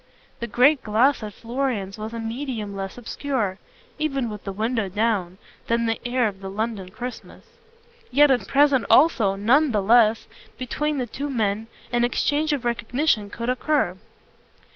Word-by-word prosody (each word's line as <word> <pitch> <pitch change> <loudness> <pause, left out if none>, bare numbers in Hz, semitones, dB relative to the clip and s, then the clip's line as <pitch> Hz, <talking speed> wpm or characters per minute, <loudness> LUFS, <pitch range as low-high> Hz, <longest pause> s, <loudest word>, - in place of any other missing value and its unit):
The 235 - -4
great 260 +6 +4
glass 235 +6 +2
at 210 -1 -5
Florian's 230 -4 -3
was 215 +1 -5
a 230 - -5
medium 225 -3 -4
less 195 +2 -5
obscure, 240 -5 -3 0.4
even 275 -6 -1
with 210 -1 -9
the 195 - -3
window 220 +1 -1
down, 195 -3 -1 0.3
than 235 0 +1
the 225 0 -1
air 245 -1 +2
of 195 -2 -7
the 195 - -6
London 210 -2 -3
Christmas; 240 +4 -8 0.6
yet 290 +2 +5
at 245 -7 +1
present 280 -2 +3
also, 245 -10 +5
none 255 +9 +3
the 210 - +2
less, 225 +1 +4 0.3
between 295 +4 -2
the 255 - -1
two 280 +5 -5
men, 220 -3 -1 0.2
an 240 0 +2
exchange 290 +5 +1
of 275 -4 -2
recognitions 235 -2 0
could 235 +1 -4
occur. 255 -6 +1
235 Hz, 160 wpm, -23 LUFS, 210-265 Hz, 0.6 s, yet